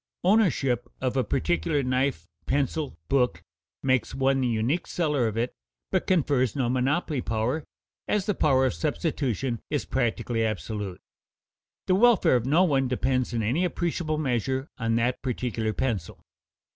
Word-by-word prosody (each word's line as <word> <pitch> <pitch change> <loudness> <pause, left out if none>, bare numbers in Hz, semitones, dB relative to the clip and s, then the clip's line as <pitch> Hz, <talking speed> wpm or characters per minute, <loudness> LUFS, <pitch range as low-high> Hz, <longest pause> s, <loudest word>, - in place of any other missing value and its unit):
Ownership 140 - +2
of 130 -1 -1
a 130 - +2
particular 165 -3 0
knife, 130 - 0 0.2
pencil, 140 - -1
book, 125 -11 +1 0.4
makes 130 -3 +1
one 135 0 +2
the 125 - +1
unique 120 +9 0
seller 150 -8 +1
of 110 0 -3
it, 120 +2 -1 0.4
but - - 0
confers 140 - +2
no 130 -4 0
monopoly 135 +3 0
power, 115 +8 -1 0.4
as 205 -2 +1
the 210 - +1
power 135 -6 +3
of 130 - +1
substitution 135 - -1
is - - -1
practically 115 0 -1
absolute; 105 -3 -3 0.8
the 185 - +2
welfare 225 - +5
of 125 0 0
no 160 +7 +5
one 135 -7 +2
depends 130 0 0
in 115 -2 -1
any 130 - +1
appreciable 170 -3 -1
measure 130 -1 -1
on 115 -1 +1
that 120 +2 0
particular 120 -3 -2
pencil. 110 -8 -2
130 Hz, 145 wpm, -26 LUFS, 120-150 Hz, 0.8 s, welfare